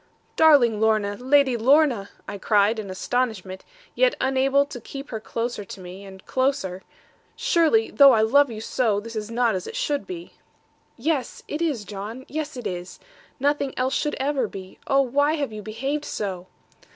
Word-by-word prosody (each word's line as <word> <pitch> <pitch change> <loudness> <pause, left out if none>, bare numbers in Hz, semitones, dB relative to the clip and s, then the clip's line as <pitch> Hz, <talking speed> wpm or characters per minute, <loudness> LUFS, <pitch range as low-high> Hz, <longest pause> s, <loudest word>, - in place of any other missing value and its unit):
'Darling 265 -9 +5
Lorna, 215 -2 +2
Lady 265 +1 +3
Lorna,' 250 -3 +3 0.2
I 205 - -6
cried, 210 +2 +2
in 205 -3 -6
astonishment, 190 -2 -2 0.3
yet - - +3
unable 270 +1 +3
but 285 - -15
to 245 - -7
keep 275 +4 -9
her 220 - -3
closer 230 0 -4
to 195 - -10
me, 185 +2 -10
and 190 -1 -13
closer; 260 -9 -1 0.5
'surely, 445 -3 +2
though 280 -1 +8
I 225 -3 +4
love 275 +6 +4
you 220 -2 -7
so, 220 -3 0
this 230 +2 -9
is 215 0 -4
not 235 -1 +1
as 185 -1 -4
it - - -7
should 290 -1 -1
be.' 350 -2 -8 0.6
'Yes, 275 +1 -2
it 300 - -4
is, 285 -11 -1
John. 210 +6 -7
Yes, 305 -1 -4
it 245 - -7
is. 180 0 -5 0.4
Nothing 280 0 0
else 255 +1 0
should 295 - 0
ever 270 -3 0
be. 190 -2 -10
Oh, 275 0 +4
why 285 +4 +2
have 285 -7 -2
you 215 - -6
behaved 270 +8 -3
so?' 185 -3 -4
245 Hz, 175 wpm, -24 LUFS, 210-285 Hz, 0.6 s, though